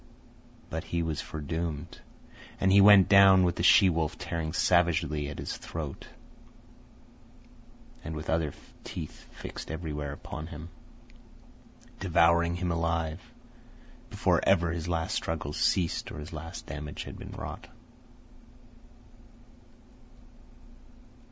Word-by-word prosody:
But 80 0 -4
he 85 0 -1
was 80 -2 -2
foredoomed, 80 0 -5 0.6
and 95 - +3
he 100 +1 +7
went 100 -2 +8
down 100 -1 +7
with 90 0 +1
the - - -1
she 95 -1 +7
wolf 80 -3 0
tearing 80 -1 -3
savagely 85 -4 +2
at 75 - -7
his - - -4
throat, 75 -4 -7 2.0
and 80 - -5
with 75 +1 -6
other 80 -2 0 0.3
teeth - - -8
fixed - - -8
everywhere 75 -3 -4
upon 75 +2 -7
him, 80 0 -9 1.3
devouring 85 -1 +3
him 90 -1 -2
alive, 80 0 -1 0.9
before - - +2
ever 85 -3 +3
his 85 0 -4
last 80 -2 -1
struggles - - -3
ceased 85 -3 +1
or - - -8
his 75 +2 -8
last 80 +1 -7
damage 75 0 -6
had - - -9
been - - -9
wrought. - - -7
80 Hz, 115 wpm, -29 LUFS, 80-85 Hz, 2.0 s, went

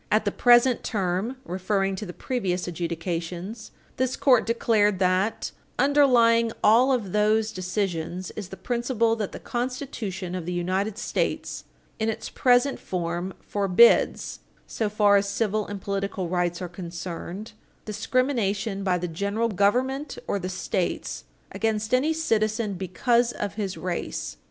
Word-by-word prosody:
At 215 - +3
the - - +1
present 240 0 +5
term, 195 +4 -1
referring 195 0 -1
to 210 - -5
the - - -5
previous 185 -5 -2
adjudications, 175 +4 -4 0.3
this 255 0 0
court 250 -6 +4
declared 215 -3 +2
that 185 +3 +1 0.3
"underlying 240 -5 +4
all 240 +5 +6
of 225 -8 0
those 215 +1 +2
decisions 185 -1 -3
is 200 -4 -7
the 190 - -8
principle 235 -2 0
that 210 -3 -3
the - - -8
Constitution 240 -7 -4
of 180 -2 -4
the - - -1
United 190 +4 -1
States, - - -2 0.3
in 220 0 +1
its 220 - -4
present 250 +2 +3
form, 175 +1 -3
forbids, 200 +3 +3 0.3
so 220 -2 -2
far 205 -1 +4
as 200 0 0
civil 210 0 0
and 205 -1 -5
political 195 -1 -3
rights 175 0 -1
are - - -3
concerned, 175 +3 -7 0.3
discrimination 215 -3 0
by 185 -2 +2
the 180 0 -3
General 200 +7 -1
Government 255 +8 +1
or 200 - -1
the 185 0 -4
States 185 0 -2 0.3
against 220 0 -1
any 270 +5 +3
citizen 220 -8 0
because 235 +6 +1
of 205 -2 -4
his 200 -4 -3
race. 170 - -4
205 Hz, 140 wpm, -25 LUFS, 185-230 Hz, 0.3 s, all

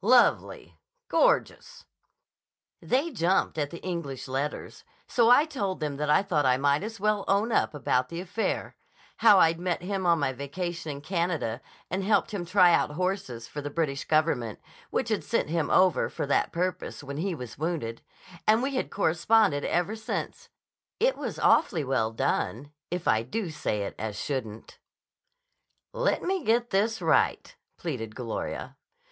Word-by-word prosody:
"Lovely! 245 +3 +3 0.3
Gorgeous!" - - +1 1.0
"They 280 +7 0
jumped 180 - +1
at 145 -1 -1
the 170 - -10
English 170 -9 -4
letters. 135 +3 -4 0.2
So 235 -2 +3
I 265 +5 +7
told 200 - -3
them 145 -2 -3
that 150 0 -2
I 150 - +4
thought 165 -7 +1
I 130 -2 +3
might 140 +2 +2
as 220 +1 -6
well 210 0 +1
own 205 +4 +2
up 160 - +1
about 125 -2 0
the 170 - -5
affair; 190 +5 -3 0.4
how 220 -3 +7
I'd 165 -2 +4
met 175 -1 -2
him 190 -1 -2
on 170 -1 +5
my 135 -3 0
vacation 165 +5 -5
in 140 0 -7
Canada 165 - -2 0.3
and 190 +2 -1
helped 210 +3 +2
him 185 -5 -4
try 180 -1 +5
out - - +3
horses 180 - -3
for 145 - -6
the 145 - -4
British 145 -3 -2
Government, 150 -8 +1 0.3
which - - -1
had - - 0
sent - - -1
him 165 -2 0
over 185 -2 +3
for - - -3
that 140 - +1
purpose 180 -3 -3
when 140 0 -6
he 180 +2 -1
was 125 -3 -9
wounded, 155 -9 -3 0.5
and 220 +3 +4
we 275 +1 -1
had 260 - -1
corresponded 185 -2 +2
ever 175 +6 0
since. 470 - -5 0.5
It - - +3
was - - -5
awfully 160 -6 +3
well 130 -5 0
done, 120 +4 -2 0.2
if 175 -1 -3
I 110 - +4
do 170 - -4
say 105 -9 -2
it 100 - -5
as 105 -1 -4
shouldn't." 115 -6 -5 1.1
"Let - - 0
me 375 -2 -1
get 235 +1 +1
this 220 +3 +1
right," - - +2 0.2
pleaded 115 -10 -5
Gloria. 115 -4 -5
170 Hz, 165 wpm, -27 LUFS, 140-200 Hz, 1.1 s, I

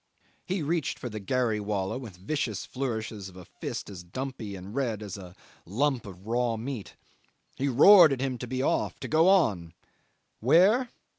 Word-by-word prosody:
He 185 -3 -1
reached 160 0 -1
for 125 - -6
the 110 -1 -6
gharry 115 +1 0
wallah 100 +1 -2
with 115 -8 -9
vicious 110 0 -3
flourishes 110 -6 -4
of 95 - -15
a 90 - -11
fist - - -6
as 95 -4 -8
dumpy 110 +1 -6
and 95 +2 -9
red 115 -6 -2
as 100 -3 -6
a 90 -3 -10 0.3
lump 125 +4 -1
of 95 0 -12
raw 120 0 0
meat. 120 -2 -6 0.6
He 140 - -1
roared 160 - +8
at 135 - -1
him 130 -2 -2
to 125 - -5
be 130 +2 -2
off, - - 0
to - - -4
go 160 +3 +4
on. 100 - +2 0.6
Where? 190 - +4
120 Hz, 175 wpm, -28 LUFS, 100-140 Hz, 0.6 s, roared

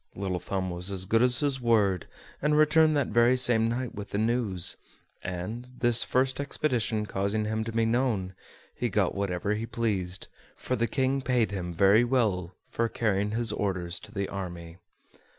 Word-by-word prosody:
Little 95 -2 -2
Thumb 95 -1 -3
was 90 +2 -1
as 95 -1 +1
good 115 +4 +2
as 125 0 +3
his 140 -3 0
word, 105 -6 +2 0.3
and 150 +1 +2
returned 155 0 +4
that 140 - 0
very 120 +3 +4
same 120 -3 +4
night 125 +1 -3
with 100 0 -7
the - - -3
news; 110 -5 0 0.5
and, 90 +7 -5
this 120 -1 +3
first 130 +1 +1
expedition 120 -7 -1
causing 100 +2 -1
him 110 +1 -1
to 115 - -4
be 115 0 +1
known, 115 -6 0 0.4
he - - -2
got - - +1
whatever 100 +1 -1
he 110 +2 -3
pleased, 95 -6 -2 0.3
for 130 - -3
the 115 -1 0
King 130 +3 0
paid 125 -4 +1
him 90 -3 -4
very 100 +6 +4
well 105 -9 0 0.2
for 115 0 0
carrying 105 -3 0
his 115 -1 +2
orders 90 -4 -2
to - - -13
the 100 -1 -3
army. 85 -3 -7
110 Hz, 175 wpm, -28 LUFS, 95-120 Hz, 0.5 s, returned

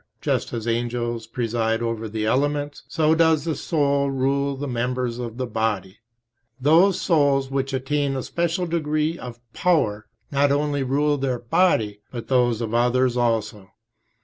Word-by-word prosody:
Just - - -1
as 115 -1 -4
angels 120 0 -2
preside 115 -1 -1
over 115 -1 -3
the 110 0 -3
elements, 145 +4 0
so 160 -1 +2
does 160 -2 +3
the 165 -1 -1
soul 140 -3 0
rule 140 +1 0
the 145 +1 -4
members 125 -1 -2
of 120 -1 -5
the 130 - -2
body. 105 -5 -2 0.6
Those 165 +8 +4
souls 140 -5 +2
which 135 0 -1
attain 135 +1 -1
a 130 - -3
special 170 +1 -1
degree 155 -1 -1
of 120 -1 -8
power 110 - +1 0.2
not 140 0 +3
only 145 0 0
rule 145 +2 +1
their 130 -2 -1
own 120 - -30
body 110 - +2
but 120 -2 -7
those 120 -3 +2
of 115 -1 -3
others 125 +1 +2
also. 110 -4 -1
130 Hz, 155 wpm, -23 LUFS, 115-145 Hz, 0.6 s, Those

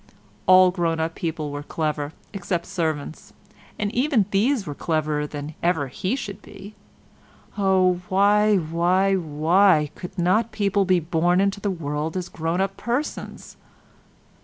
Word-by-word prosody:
All 185 0 +7
grown 170 -3 -1
up 160 +1 -1
people 160 -3 -4
were 145 0 -5
clever, 150 -1 -3 0.2
except 175 -3 -3
servants—and 185 +5 -5
even 250 -4 +2
these 220 +3 +1
were 150 - -5
cleverer 150 -1 -1
than 145 +1 -7
ever 160 -6 0
he 185 - -2
should 205 -6 -6
be. 205 0 -12 0.8
Oh, 185 -3 +2
why, 205 +2 +4
why, 180 +3 +1
why, 160 -1 +3
could 180 - -9
not 195 +7 +2
people 200 -1 +1
be 185 -1 +3
born 170 +2 +1
into 200 +1 +1
the 205 - -1
world 160 -1 -3
as 180 -1 -4
grown 165 +3 -2
up 195 0 -2
persons? 245 +6 -4
180 Hz, 135 wpm, -23 LUFS, 160-200 Hz, 0.8 s, All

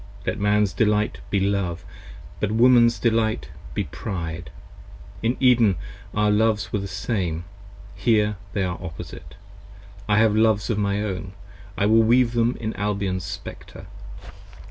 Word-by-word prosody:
Let - - -2
Man's 105 0 +2
delight 105 -1 +1
be 100 - +1
Love; 95 -3 -1 0.5
but 105 - -1
Woman's 120 0 +5
delight 110 - 0 0.3
be - - 0
Pride. 85 -4 -5 0.7
In 115 +3 0
Eden 120 -7 +4 0.4
our 105 0 +3
Loves 105 0 +1
were 105 - +1
the 100 - -4
same, 95 -4 -2 0.5
here 105 -3 +2 0.2
they 100 - 0
are 90 -1 -3
opposite. 90 -5 -9 0.7
I 105 - +4
have 110 -1 +4
Loves 110 0 +2
of 105 - -1
my 100 0 0
own, 95 -2 -4 0.4
I 100 - +2
will 110 +2 +5
weave 120 +2 +4
them 120 +1 +1
in 110 -1 -3
Albion's 100 -3 -1
Spectre. 100 -2 -8
105 Hz, 140 wpm, -23 LUFS, 95-115 Hz, 0.7 s, Woman's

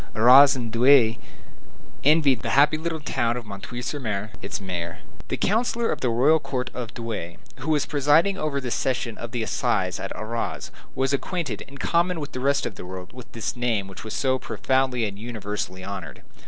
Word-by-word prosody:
Arras 135 +5 +8
and 120 -3 -4
Douai 120 -1 +5 0.9
envied 145 -5 +4
the - - -3
happy 150 +2 +6
little 160 +1 -3
town 120 -4 0
of 120 - -7
M. 100 -1 -8 0.2
sur 145 +2 -4
M. 105 -1 -2
its 100 - -4
mayor. 85 -4 -4 0.3
The - - -2
Councillor 230 +2 +1
of - - -3
the 125 - +1
Royal 135 +8 +4
Court 130 -3 -3
of 120 -3 -6
Douai, 110 -8 -5 0.2
who 135 +5 -5
was 150 -3 +2
presiding 150 +7 +3
over 155 -6 -1
this 125 -3 -3
session 125 -3 -1
of 120 - -5
the 115 0 -2
Assizes - - 0
at - - -5
Arras, 115 +2 -4 0.2
was 135 +1 +1
acquainted, 170 +3 -2
in 140 - -12
common 170 +4 +1
with 145 -1 -6
the 130 - -5
rest 140 +2 +1
of - - -3
the - - -9
world, 90 0 -8
with 125 -2 -11
this 115 +2 -3
name 115 -5 0
which 95 - -10
was 110 - -5
so 130 -1 +1
profoundly 130 -3 0
and 100 -1 -5
universally 105 -5 -5
honored. 100 +1 -7
125 Hz, 195 wpm, -24 LUFS, 110-145 Hz, 0.9 s, Arras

